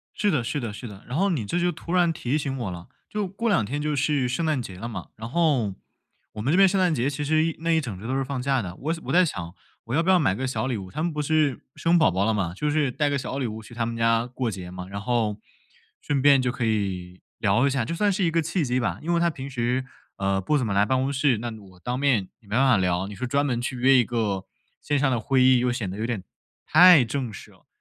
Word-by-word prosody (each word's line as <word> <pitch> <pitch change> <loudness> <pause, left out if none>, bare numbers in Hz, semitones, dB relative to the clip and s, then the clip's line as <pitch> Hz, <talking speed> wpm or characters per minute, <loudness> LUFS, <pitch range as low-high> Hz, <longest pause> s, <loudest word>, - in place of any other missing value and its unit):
是 205 - +1
的 150 -8 +1
是 145 - -2
的 115 -4 -4
是 115 +4 -8
的， 105 -3 -11
然 125 - -3
后 195 +4 +2
你 135 - -1
这 175 - -1
就 175 0 +1
突 170 - -8
然 175 -2 +3
提 140 -3 -2
醒 140 -3 -2
我 115 -6 -3
了， 85 0 -9 0.2
就 210 -1 -2
过 200 +5 -3
两 200 - +3
天 140 +8 -3
就 150 0 -1
是 140 -2 +1
圣 130 +7 -1
诞 155 -4 +1
节 100 -6 -7
了 115 +6 -6
嘛， 115 - -7
然 110 +1 -7
后 140 - +1 0.6
我 105 - -6
们 135 +6 +1
这 - - +4
边 195 0 +7
圣 195 +1 0
诞 180 -3 +3
节 130 -1 0
其 145 +1 -3
实 155 +2 +2
一 165 -1 -2
那 165 +1 -1
一 165 -1 +4
整 115 -11 -6
周 110 - -8
都 130 - -1
是 135 - 0
放 135 -1 -4
假 135 0 +1
的。 90 -5 -6
我 155 +9 -2
想 165 0 -5
我 - - -2
在 180 +1 +6
想 90 - -5 0.3
我 115 - -5
要 160 - +3
不 180 - +1
要 185 - +6
买 130 - +2
个 130 +6 -3
小 130 0 -2
礼 130 -3 -1
物？ 95 -3 -7
他 155 - -3
们 170 0 -1
不 150 0 -2
是 150 -2 +1
生 170 +1 +3
宝 160 - +4
宝 95 +2 0
了 110 +1 +1
嘛， 95 -5 -1
就 150 +9 -1
是 145 -3 +1
带 145 +4 0
个 145 - 0
小 135 0 -4
礼 130 - -1
物 110 0 -6
去 110 - -13
他 115 -1 -1
们 115 0 -4
家 115 0 +2
过 125 -1 -3
节 90 -3 -7
嘛。 90 0 -7
然 100 +1 -5
后 110 -2 0 0.6
顺 145 -2 -1
便 140 -1 +5
就 125 - 0
可 125 -3 -2
以 95 -4 -2 0.2
聊 110 +5 +2
一 - - +2
下， 130 -3 0
就 150 - -3
算 205 +4 +2
是 195 0 0
一 165 - +2
个 165 0 +1
契 165 +2 -1
机 125 -1 0
吧， 95 -7 -1
因 170 +2 0
为 170 - +2
他 170 0 +3
平 135 -3 -7
时， 125 0 -1 0.3
呃， 95 0 0
不 145 +11 +1
怎 125 - -1
么 100 - -1
来 100 +1 +4
办 130 +5 +1
公 135 +1 0
室， 140 -4 +2
那 120 +2 -4
我 95 -4 -16
当 125 +6 -3
面 125 -9 +1
没 110 - -22
办 110 +4 0
法 125 - +5
聊。 90 -1 0
你 105 - -8
说 115 +6 -4
专 140 +3 +1
门 120 -4 -1
去 130 +1 -3
约 130 +2 +4
一 125 - +5
个 105 -5 -2 0.4
线 145 -1 0
上 135 0 +2
的 125 - +1
会 130 +4 +2
议， 130 0 +6
又 125 0 +1
显 115 -5 -3
得 95 - -6
有 110 - -3
点 115 -5 -3 0.4
太 175 -3 +8
正 120 0 -3
式 - - -11
了， - - -24
130 Hz, 315 characters per minute, -25 LUFS, 110-150 Hz, 0.6 s, 太